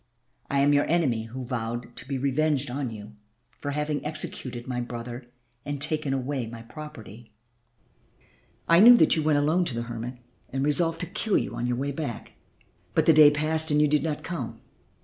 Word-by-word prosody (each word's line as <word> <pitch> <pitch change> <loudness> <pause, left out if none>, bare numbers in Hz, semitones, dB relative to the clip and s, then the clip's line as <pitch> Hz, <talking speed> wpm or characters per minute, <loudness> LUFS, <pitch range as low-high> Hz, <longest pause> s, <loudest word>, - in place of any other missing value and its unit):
I 140 0 +2
am 145 +1 +4
your 145 0 +3
enemy 135 -10 +1
who 125 +3 -7
vowed 120 -1 -4
to 120 - -8
be 135 -1 -2
revenged 140 0 0
on 135 -1 -3
you 105 -1 -10 0.4
for 145 - -4
having 150 +1 -2
executed 130 -5 -2
my 125 -1 -2
brother 120 +1 -7 0.4
and 145 -1 -4
taken 150 0 -1
away 135 -2 -2
my 115 0 -9
property: 115 -5 -11 1.4
I 170 +1 +6
knew 240 +4 +9
that - - +4
you 160 - 0
went 150 -1 +2
alone 155 +5 +2
to 130 - -2
the 115 - -2
hermit 120 +1 -6 0.3
and 135 +1 -2
resolved 165 +3 +1
to - - -1
kill 210 +3 0
you - - -2
on 120 - -2
your 125 0 -1
way 140 +2 -2
back. 140 -5 -5 0.6
But - - +3
the 160 - +6
day 150 -1 +8
passed 155 +2 +1
and 150 0 +3
you 150 - +5
did 150 0 +2
not 155 -2 -3
come. 175 -1 -5
140 Hz, 190 wpm, -26 LUFS, 120-155 Hz, 1.4 s, knew